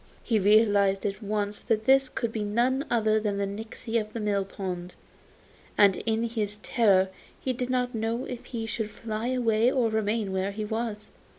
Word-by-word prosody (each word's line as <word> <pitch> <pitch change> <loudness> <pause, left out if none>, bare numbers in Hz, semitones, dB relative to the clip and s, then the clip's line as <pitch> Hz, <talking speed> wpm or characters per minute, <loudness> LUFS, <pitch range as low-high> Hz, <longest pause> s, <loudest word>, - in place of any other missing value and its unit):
He 225 -3 +2
realised 200 -1 +4
at 200 +1 -2
once 205 0 -2
that 220 -1 -1
this 270 0 +5
could 235 -3 -2
be 220 -2 -2
none 245 +7 +1
other 220 -2 +2
than 210 -2 -1
the 200 - 0
nixy 220 +3 -3
of 215 0 -10
the 230 - -4
mill 205 -2 0
pond, 180 -2 -6 0.8
and 200 -2 +6
in 225 0 +1
his 215 -3 -2
terror 195 -5 +3 0.3
he 260 - -1
didn't 250 0 -1
know 225 +2 -2
if 245 -2 -7
he 230 -2 -4
should 225 -1 -3
fly 220 +1 -4
away 240 -2 +2
or 250 -4 +2
remain 220 -1 0
where 190 +1 0
he 215 +1 -3
was. 220 -1 -4
220 Hz, 180 wpm, -27 LUFS, 205-235 Hz, 0.8 s, and